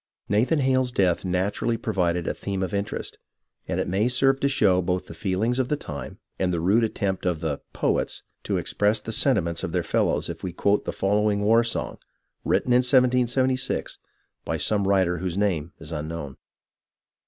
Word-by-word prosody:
Nathan 115 +10 +2
Hale's 130 -1 +2
death 95 -7 +1
naturally 100 +5 0
provided 90 -6 -1
a - - 0
theme 95 -1 -3
of 90 - -4
interest, 100 0 -3 0.5
and - - -1
it - - -1
may 100 +5 +1
serve 135 +2 +2
to 140 - +1
show 95 -9 +3
both 90 +1 -1
the - - -10
feel 95 +3 -2
ings 125 +3 +1
of 130 -1 0
the 150 - +2
time 70 - -7 0.2
and 90 -1 +1
the 85 - -1
rude 100 +8 +3
attempt 100 -4 -1
of 90 -3 0
the 75 -3 -3
" - - -47
poets - - 0
" - - -50
to - - 0
express 105 +2 +1
the 110 - -6
sentiments 95 -9 +1
of 85 - -3
their 90 -2 +1
fellows - - 0
if - - -7
we 90 - -4
quote 100 +3 +1
the - - -2
following 105 +1 +1
war 115 +3 +4
song, 115 - -4 0.4
written 125 - +1
in - - +6
1776, 125 0 +2 0.4
by - - -2
some 100 -2 +2
writer 95 -3 +2
whose 90 0 -3
name 85 -6 0
is 80 0 -9
unknown. 75 -2 -5
100 Hz, 190 wpm, -25 LUFS, 90-120 Hz, 0.5 s, in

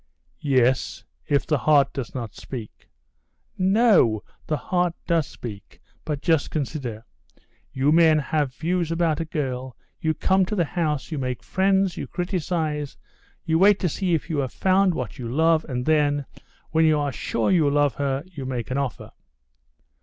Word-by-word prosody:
"Yes, 130 -3 +1 0.2
if 140 -1 +1
the 150 -3 +1
heart 140 -2 +3
does 135 -2 -5
not 115 -5 -5
speak...." 115 -5 -9 0.7
"No, 190 - +4 0.2
the 155 - 0
heart 175 +1 0
does 165 -3 +1
speak; 105 -5 -10 0.3
but 150 -3 -3
just 160 -3 +2
consider: 130 -7 -4 0.7
you 135 +3 +1
men 160 -1 +5
have 145 -3 -1
views 170 0 -1
about 165 -2 +1
a 165 - -2
girl, 130 -5 -4 0.2
you 160 -1 0
come 190 0 +2
to 210 - -2
the 175 -4 +2
house, 155 -3 -2
you 155 - -2
make 125 -2 -3
friends, 190 0 +1
you - - -4
criticize, 165 -5 -2 0.5
you 160 -1 +2
wait 200 +1 +6
to 180 - +1
see 180 +2 0
if 160 - -3
you 160 -4 -1
have 130 -3 -2
found 190 -1 +3
what 125 -4 -5
you 120 - -4
love, 160 +3 +3
and 125 -1 -2
then, 145 -2 +2 0.5
when 160 0 +3
you 155 -1 +4
are 145 -1 -1
sure 115 -3 -1
you 160 -6 +4
love 145 -1 +2
her, 140 0 -2
you 170 -7 -9
make 130 -1 -4
an 135 - 0
offer...." 135 -5 -4
150 Hz, 170 wpm, -24 LUFS, 135-170 Hz, 0.7 s, wait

